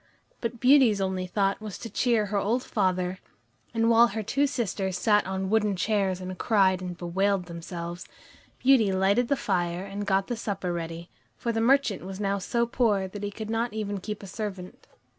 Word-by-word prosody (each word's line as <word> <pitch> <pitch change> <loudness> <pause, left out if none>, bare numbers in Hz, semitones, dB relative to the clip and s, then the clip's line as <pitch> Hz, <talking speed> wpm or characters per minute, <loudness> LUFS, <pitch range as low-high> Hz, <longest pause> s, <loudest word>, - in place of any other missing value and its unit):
But 230 0 -4
Beauty's 255 -5 +5
only 190 -1 -1
thought 195 +2 0
was 215 -3 -6
to 235 - -7
cheer 230 0 +1
her 205 0 -2
old 235 +6 0
father, 185 -2 0 0.5
and 225 0 +1
while 230 +1 +6
her 220 -1 -4
two 280 +7 +1
sisters 195 -8 -2
sat 205 +2 +3
on 190 0 -2
wooden 210 -2 +2
chairs 195 -1 0
and 185 0 -6
cried 190 -4 +3
and 180 -1 -5
bewailed 190 +2 0
themselves, 170 +1 -7 0.5
Beauty 250 -6 +4
lighted 195 +6 +2
the 280 - +2
fire 175 -2 -1
and 200 +1 -5
got 195 -1 +2
the 240 - -3
supper 195 -5 -3
ready, 170 0 -6 0.3
for 235 - -2
the 225 0 -1
merchant 245 -6 +3
was 190 +1 -7
now 200 -1 0
so 235 +5 0
poor 220 -5 +1
that 205 +1 -8
he 205 - -2
could 215 +1 -6
not 230 0 -1
even 205 -2 -3
keep 210 +2 -6
a - - -6
servant. 190 -2 -7
200 Hz, 190 wpm, -27 LUFS, 185-225 Hz, 0.5 s, while